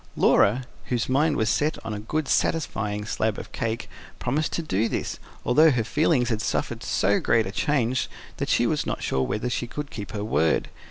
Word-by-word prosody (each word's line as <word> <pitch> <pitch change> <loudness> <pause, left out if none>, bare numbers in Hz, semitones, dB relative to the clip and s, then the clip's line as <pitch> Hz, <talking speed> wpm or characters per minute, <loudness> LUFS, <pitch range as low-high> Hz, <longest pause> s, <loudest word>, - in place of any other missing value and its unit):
Laura, 120 +6 +4 0.2
whose 120 -3 -1
mind 145 +3 +2
was 110 - +1
set 150 +6 +1
on 110 - -3
a 105 - -4
good, 145 +8 -2
satisfying 105 -12 0
slab 110 -1 -1
of - - -8
cake, 115 0 -3 0.3
promised 150 +6 -1
to 170 - -1
do 110 -5 0
this, - - -3 0.3
although 155 +6 +6
her 125 -6 +1
feelings 135 0 +2
had 110 -2 0
suffered - - -2
so 100 +2 +2
great 115 -1 +2
a 95 - -4
change 130 0 0 0.3
that - - -2
she - - +3
was - - 0
not - - -3
sure 65 - 0
whether 105 - -1
she 120 -1 -2
would 150 -1 -4
keep 105 -3 -7
her 105 -1 -3
word. 80 -7 +1
115 Hz, 200 wpm, -25 LUFS, 105-145 Hz, 0.3 s, although